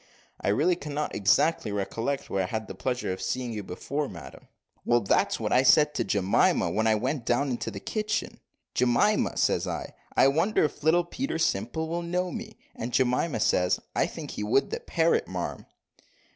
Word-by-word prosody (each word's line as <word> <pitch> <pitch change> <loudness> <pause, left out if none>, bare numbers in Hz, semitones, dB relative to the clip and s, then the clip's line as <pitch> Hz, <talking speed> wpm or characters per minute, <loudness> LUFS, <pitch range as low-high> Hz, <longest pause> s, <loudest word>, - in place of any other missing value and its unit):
"I - - -1
really 150 - +3
cannot 150 -2 -4
exactly 110 +4 +2
recollect 115 +7 -2
were 95 - -1
I 90 - -1
had 110 +2 -4
the - - -6
pleasure 125 +1 -2
of 95 - -7
seeing 125 -2 -2
you 105 - -4
before, 140 +10 -4
madam." 85 -6 -11 0.4
"Well, 120 0 +3
that's 100 - +1
what - - -1
I 125 - +6
said 150 +3 +5
to - - 0
Jemima, 100 -1 +2
when 110 +1 +1
I 110 - +4
went 130 +4 -2
down 130 +4 +1
in 120 - -1
the 105 -4 -5
kitchen, 215 - -3 0.3
`Jemima,' 125 - +2
says - - +1
I, - - -4 0.2
`I 135 - +5
wonder 180 +8 +2
if 150 - -2
little 165 +3 +3
Peter 255 +2 -3
Simple 160 +1 -1
will 170 +2 -2
know 180 +1 -2
me.' 220 -1 -7 0.2
And 115 +2 -5
Jemima 125 +2 +1
says, 90 -3 +2 0.2
`I - - +2
think - - -7
he - - -4
would 125 +6 +1
the - - -2
parrot, 165 0 +1
marm.'" 90 -6 -5
130 Hz, 185 wpm, -27 LUFS, 105-160 Hz, 0.4 s, I